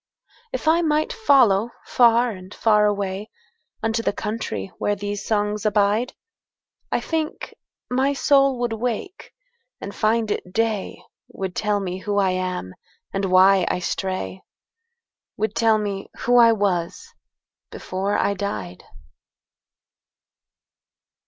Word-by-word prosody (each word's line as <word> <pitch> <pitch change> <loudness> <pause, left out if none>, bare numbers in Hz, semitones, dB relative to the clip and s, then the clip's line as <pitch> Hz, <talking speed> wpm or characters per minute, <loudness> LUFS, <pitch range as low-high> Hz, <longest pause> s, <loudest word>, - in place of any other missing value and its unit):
If - - -4
I 330 +2 +4
might 310 +7 +1
follow 250 - +4 0.2
far 235 0 +4
and 185 -2 -10
far 210 -2 +3
awayUnto 220 - -4
the - - +1
country 205 - -4
where 205 - 0
these 205 0 -4
songs 210 -1 0
abide,I 215 - -2
think 320 -1 -3 0.3
my 265 +3 +1
soul 275 -1 +3
would 240 -2 0
wake 245 - -4 0.5
and 200 - -7
find 220 0 +1
it 180 - -4
day, 220 -2 -1 0.3
Would 190 -2 -5
tell 210 -1 0
me 185 -1 -4
who 205 +1 -2
I 195 -2 +3
am, 185 - -3 0.4
and 195 0 -1
why 185 0 +5
I - - 0
stray,—Would 215 - -6
tell 225 -1 +3
me 200 -2 -4
who 245 - +2
I 230 -1 +7
was 190 -6 -1 0.6
before 195 +2 -3
I 200 - +1
died. 105 - -5
210 Hz, 115 wpm, -22 LUFS, 195-240 Hz, 0.6 s, I